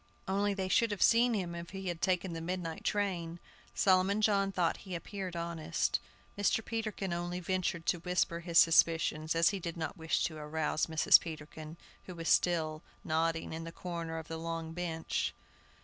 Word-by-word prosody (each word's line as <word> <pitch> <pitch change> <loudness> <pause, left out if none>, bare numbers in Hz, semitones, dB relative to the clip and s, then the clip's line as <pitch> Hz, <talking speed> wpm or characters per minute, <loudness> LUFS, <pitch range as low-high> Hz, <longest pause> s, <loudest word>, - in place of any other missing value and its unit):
Only 200 +1 +1
they 190 -1 -2
should 230 +5 +3
have 205 -2 0
seen 235 0 +5
him 180 -4 -2
if 170 0 -7
he 190 0 -6
had 170 -2 -3
taken 185 -1 0
the 165 - -5
midnight 170 -1 -4
train. 175 -5 -1 0.4
Solomon 190 +2 +3
John 200 -2 +2
thought 175 -3 +1
he 185 -3 -7
appeared 185 +1 -5
honest. 170 -1 -1 0.4
Mr. 205 +2 +1
Peterkin 215 -5 -3
only 175 +1 -3
ventured 180 -2 -1
to 175 - +1
whisper 180 -1 0
his 170 -1 -1
suspicions, 165 -1 +4
as 165 +1 +5
he 200 - -3
did 170 -1 -5
not 160 -1 -4
wish 160 -1 0
to 155 - -2
arouse 155 +1 -1
Mrs. 160 -1 +6
Peterkin, 155 0 -8 0.3
who 175 -3 -6
still 165 -1 +3
was 155 - -11 0.2
nodding 165 +1 0
in 165 +1 -5
the 165 - -7
corner 170 -2 -5
of 160 -1 -6
the 165 - -5
long 165 0 -4
bench. 165 -2 -2
170 Hz, 180 wpm, -32 LUFS, 165-190 Hz, 0.4 s, Mrs